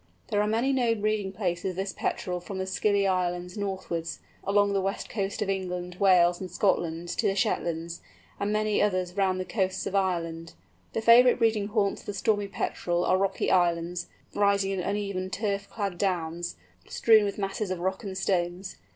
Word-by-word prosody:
There 205 - +2
are 210 - +1
many 235 +5 +1
known 235 -4 +1
breeding 210 -2 0
places 180 -3 -2
of 185 - -5
this 195 +1 -3
Petrel 180 -1 -2
from 190 +2 -7
the 190 - -2
Scilly 200 +1 +1
Islands 180 -1 -1
northwards, 190 -5 -3 0.3
along 200 0 +2
the 195 - +1
west 195 +1 -3
coast 205 0 -2
of 200 - -4
England, 180 -2 -4
Wales, 180 -2 +5
and 185 - -5
Scotland 175 -2 0
to - - 0
the 195 - +1
Shetlands, 170 -3 -1 0.4
and 200 +1 -1
many 215 0 +1
others 185 -3 0
round 190 -2 +1
the 185 - -2
coasts 190 -3 -1
of - - -4
Ireland. 165 -4 -1 0.4
The 225 - -2
favourite 245 +2 +7
breeding 220 -4 +2
haunts 205 -2 0
of - - -20
the 205 - -4
Stormy 205 0 +1
Petrel 175 -3 -1
are - - +3
rocky 195 0 0
islands, 175 0 +1 0.3
rising 200 -1 +2
in 195 - -2
uneven 195 0 -2
turf 200 0 -2
clad 200 -5 -3
downs, 175 -3 -1 0.3
strewn 220 -2 +5
with 200 -1 -2
masses 200 +1 -2
of 185 - -2
rock 190 +4 -2
and 190 -2 -5
stones. 180 0 -1
195 Hz, 185 wpm, -27 LUFS, 180-205 Hz, 0.4 s, favourite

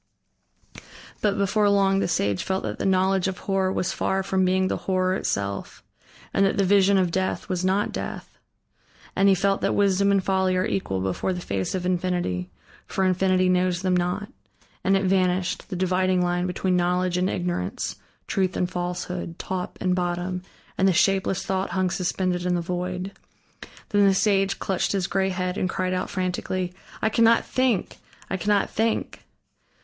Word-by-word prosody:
But 205 -1 +1
before 205 +1 +2
long 195 -1 +3
the - - +1
sage 100 - 0
felt 190 0 -2
that - - -4
the - - 0
knowledge 190 0 +2
of 190 -1 -3
horror 190 -1 0
was 185 - -1
far 190 0 0
from 190 -1 +1
being 185 +1 +2
the - - -1
horror 185 0 +2
itself, 100 - -3 0.5
and 195 - +3
that 195 - +2
the 200 - +3
vision 195 +1 +4
of 180 -2 +2
Death, 190 +2 -1
was 185 -2 -2
not 190 +2 +1
Death. - - -6 0.8
And 195 +1 +4
he 195 - +5
felt 195 +1 +1
that - - +1
wisdom 200 0 +3
and 195 -1 +2
folly 190 -1 +1
are 185 - +1
equal 95 - -2
before 95 - -1
the 180 - -4
face 100 - -2
of 180 -1 -3
Infinity, 175 - -1 0.4
for 190 - 0
Infinity 185 0 +2
knows 180 0 +1
them 185 -1 +2
not. 180 +4 -1 0.5
And 195 +1 +3
it 195 - -1
vanished, 185 -1 +1
the 190 - -4
dividing 185 0 +1
line 175 0 0
between 180 +1 0
knowledge 180 0 +1
and 185 +1 +1
ignorance, 175 - -3 0.3
truth 190 -2 0
and 180 - +1
falsehood, 180 -1 -4
top 185 -1 -4
and 185 -1 +1
bottom, 180 0 -2 0.4
and 190 - +4
the 190 - +4
shapeless 190 +1 +2
thought 190 0 -1
hung 185 -1 0
suspended 180 0 -1
in 180 0 +1
the 175 - 0
void. 180 +2 -3 0.8
Then 205 -1 +4
the 195 - +4
sage 195 -1 +2
clutched 190 0 -1
his 195 -2 0
gray 190 +2 0
head 185 0 -2
and 185 - 0
cried 185 -1 -1
out 185 0 -2
frantically: 185 -1 -2 0.3
"I 220 - +4
cannot 230 +1 +4
think! 255 -7 0 0.3
I 190 - 0
cannot 205 +1 +1
think!" 225 +1 -1
185 Hz, 175 wpm, -24 LUFS, 180-195 Hz, 0.8 s, he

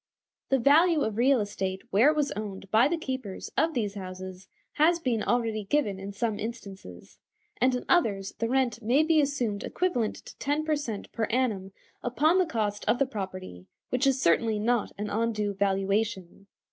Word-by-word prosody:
The 270 - +4
value 305 +5 +4
of 220 -5 -1
real 260 +2 +4
estate 190 -2 -3
where 225 +9 +5
it 310 - +1
was 295 -2 0
owned 195 -2 -6
by 225 +4 +5
the 340 - -1
keepers 260 -10 -5
of 320 0 +1
these 210 -5 -1
houses 185 -1 -8 0.3
has 325 +3 +4
been 250 -9 -1
already 225 -3 0
given 205 -5 0
in 195 +1 -6
some 210 +1 -2
instances, 195 - -8 0.4
and 255 +1 +3
in 250 - -4
others 200 - +1
the 230 - 0
rent 250 -3 +1
may 250 +7 +3
be 315 -1 +4
assumed 245 -8 -1
equivalent 250 -12 -1
to - - -11
ten 295 +2 -1
per 310 -1 +2
cent. 235 -9 -5
per 225 - -1
annum 215 -6 -1 0.3
upon 305 +9 +2
the 365 - +2
cost 210 -7 -2
of - - +3
the 275 - +2
property, 185 - -7 0.2
which 250 +2 +1
is 270 -1 +2
certainly 220 +3 +2
not 230 +2 0
an 210 0 -4
undue 215 -2 0
valuation. 195 0 -1
225 Hz, 180 wpm, -28 LUFS, 200-270 Hz, 0.4 s, where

